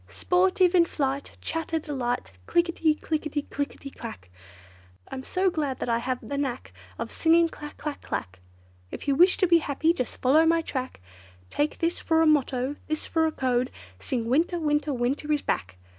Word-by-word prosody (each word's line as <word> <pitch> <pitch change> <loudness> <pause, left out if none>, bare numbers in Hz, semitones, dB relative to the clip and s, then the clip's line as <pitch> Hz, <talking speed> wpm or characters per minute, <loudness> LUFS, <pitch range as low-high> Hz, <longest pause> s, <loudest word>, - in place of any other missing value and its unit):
Sportive 365 0 +2
in 355 -2 +6
flight, 275 -3 -3
chatter 325 0 -2
delight, 250 - -3 0.2
Click 345 +1 +3
i - - +1
ti, 315 -2 +2
click 310 0 -2
i - - -7 0.5
ti 275 - -9
clack! 90 - -9 0.8
I'm 260 - -6
so 370 +5 +1
glad 290 -6 -2
that - - -3
I 230 0 +2
have 250 +1 -3
the 280 0 -2
knack 265 -3 -3 0.2
Of - - -4
singing 335 +1 +4
clack! 295 -2 -9
clack! 300 -1 -5
clack! 95 -1 -5 0.5
If - - -8
you 280 - +4
wish 355 +6 +5
to 375 - +3
be 340 -1 +6
happy, 315 +2 +1
just 255 -9 -4
follow 285 +5 +5
my 330 0 +3
track, 260 - -4 0.5
Take 295 +1 0
this 335 +1 0
for 320 -1 +2
a - - +4
motto, 280 -2 +2
this 310 0 -2
for 320 -1 +2
a - - -1
code, 255 -3 0 0.3
Sing 235 - -2
'winter, 325 +8 +2
winter, 295 -1 +1
winter 270 +4 -1
is 295 -1 +1
back! 95 0 -2
295 Hz, 190 wpm, -26 LUFS, 260-325 Hz, 0.8 s, in